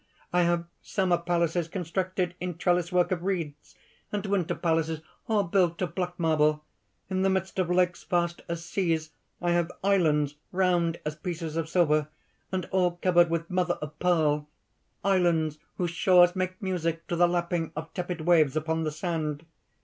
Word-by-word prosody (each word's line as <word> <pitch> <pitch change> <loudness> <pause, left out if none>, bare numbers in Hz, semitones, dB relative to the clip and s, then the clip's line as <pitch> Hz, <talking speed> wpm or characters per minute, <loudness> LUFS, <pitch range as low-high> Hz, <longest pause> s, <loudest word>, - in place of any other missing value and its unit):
I 180 - +4
have 170 0 +1 0.2
summer 180 -3 +1
palaces 170 -1 0
constructed 180 +1 -2
in 180 -2 -4
trellis 175 0 +1
work 180 0 +2
of 180 -2 0
reeds, 165 -6 -4 0.4
and 205 -1 -2
winter 195 -4 0
palaces 160 -2 0 0.3
all 215 -2 +2
built 175 -2 +1
of 170 -3 -3
black 180 -1 -3
marble. 155 -2 +2 0.5
In 185 0 0
the 195 - +3
midst 190 0 -1
of 180 -2 +1
lakes 180 0 +1
vast 175 -2 0
as 170 0 -4
seas, 165 -3 -1 0.3
I 175 - +2
have 175 0 +1
islands 150 -7 +2
round 175 -3 +1
as 150 0 -2
pieces 165 -1 -5
of 165 -1 -2
silver, 155 -4 +3 0.4
and 185 -2 -1
all 180 -2 +2
covered 175 -2 +5
with 165 +1 -2
mother 180 -1 +1
of 150 0 -8
pearl, 150 -4 +2 0.6
islands 170 -5 +2 0.2
whose 175 -2 -1
shores 180 +1 +5
make 185 0 -2
music 170 -4 -2
to 175 - -2
the 175 +1 +5
lapping 170 -1 -1
of 160 +2 -6
tepid 175 -2 -4
waves 155 -4 +4
upon 160 +1 0
the 155 - -1
sand. 155 -2 -3
175 Hz, 165 wpm, -28 LUFS, 160-180 Hz, 0.6 s, covered